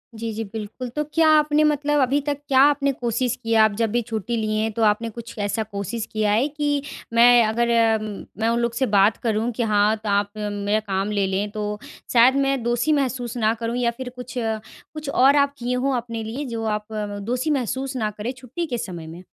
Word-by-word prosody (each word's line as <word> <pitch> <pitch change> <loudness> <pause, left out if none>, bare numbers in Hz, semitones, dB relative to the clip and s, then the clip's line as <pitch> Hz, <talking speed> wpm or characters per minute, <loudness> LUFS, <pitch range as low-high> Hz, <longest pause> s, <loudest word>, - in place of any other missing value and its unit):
जी, 225 0 -4
जी, 225 +1 -3
बिल्कुल। 220 +4 -6
तो 300 - 0
क्या 325 -1 +4
आपने 300 0 +3
मतलब 295 -1 +2
अभी 270 +2 +2
तक 285 -1 0
क्या 265 -1 +3
आपने 280 -1 +3
कोशिश 245 -1 -1
किया 225 -1 +4
आप 215 - +4
जब 225 -2 +1
भी 240 +2 +1
छुट्टी 225 0 -3
लिए 215 -1 -1
हैं 220 - -1
तो 230 - -3
आपने 215 +2 +2
कुछ 235 +1 -10
ऐसा 205 +2 -1
कोशिश 210 +2 -4
किया 215 -2 +1
है 230 +7 +2
कि 290 -1 -1 0.3
मैं 240 0 +7
अगर, 235 +2 +1 0.7
मैं 225 +1 +1
उन 235 - +1
लोग 235 -1 0
से 260 +3 +1
बात 205 -1 +3
करूँ 225 +1 0
कि 240 - 0
हाँ, 210 0 +3
तो 215 -1 -5
आप 200 0 +1
मेरा 205 0 -1
काम 200 -1 -2
ले 200 -2 +1
लें 195 +2 -1
तो 210 -1 -4 0.3
शायद 245 +2 +6
मैं 275 -2 +1
दोषी 240 +5 +1
महसूस 255 -4 -1
ना 220 -1 +2
करूँ? 230 +1 -4
या 240 -1 +1
फिर 250 +1 -7
कुछ 250 0 -8
अ, 225 -2 -1 0.3
कुछ 305 -2 -6
और 275 +1 +5
आप 280 -1 +3
किए 245 0 -2
हो 265 +2 0
अपने 230 -2 -4
लिए 245 +7 -5
जो 230 -3 -4
आप 210 0 -3
अ, 205 -1 -4
दोषी 245 +8 -2
महसूस 265 0 -2
न 215 -3 0
करें 225 +4 -3
छुट्टी 265 +7 -5
के 250 -6 -3
समय 175 -7 -6
में? 170 +3 -10
230 Hz, 225 wpm, -23 LUFS, 215-260 Hz, 0.7 s, मैं